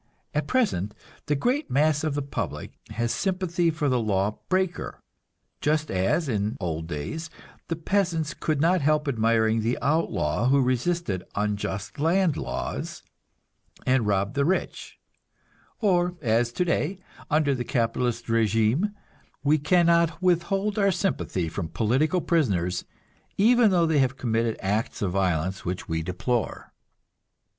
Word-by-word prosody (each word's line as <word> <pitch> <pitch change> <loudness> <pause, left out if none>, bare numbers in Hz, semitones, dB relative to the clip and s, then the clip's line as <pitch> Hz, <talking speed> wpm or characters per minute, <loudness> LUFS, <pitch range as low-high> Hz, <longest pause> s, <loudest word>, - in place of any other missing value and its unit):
At 150 - -1
present 150 - 0 0.3
the 150 - +2
great 255 - 0
mass 150 +2 +2
of 155 -3 -1
the 145 - -1
public 140 - -4 0.2
has 115 +2 -1
sympathy 180 -3 0
for 155 -2 -1
the 130 -2 +2
law 105 -1 0
breaker; 185 -1 -1 0.6
just 155 +1 0
as, 95 - +1
in 105 -3 -1
old 80 -3 -3
days, 155 - -5 0.4
the 165 - -1
peasants 165 -3 0
could 155 -3 -1
not 170 +3 +3
help 150 +1 +2
admiring 115 -2 +2
the 115 +3 0
outlaw 125 - +1
who 140 +2 +4
resisted 130 - 0
unjust 100 0 -2
land 165 +1 +2
laws - - -4 0.8
and 130 -4 +2
robbed 100 0 +1
the 140 0 +1
rich, 185 +6 -2 0.8
or 180 -4 +2
as 120 -2 +1
today, 180 +4 0 0.3
under 150 -2 +3
the 125 -2 -2
capitalist 120 -1 -1
régime, 115 - +1 0.5
we 150 +2 +3
can 170 +4 +3
not 170 -1 +3
withhold 195 +4 +1
our 200 -1 +4
sympathy 170 - -1
from 80 +1 -4
political 130 - +1
prisoners, 95 - 0 0.5
even 230 +2 +5
though 175 -3 +3
they 160 -2 +2
have 130 -1 +1
committed 115 -2 0
acts 105 +3 -1
of 95 - 0
violence 95 -1 0
which 90 +1 -4
we 80 0 -1
deplore. 100 +8 -2
140 Hz, 135 wpm, -26 LUFS, 105-170 Hz, 0.8 s, even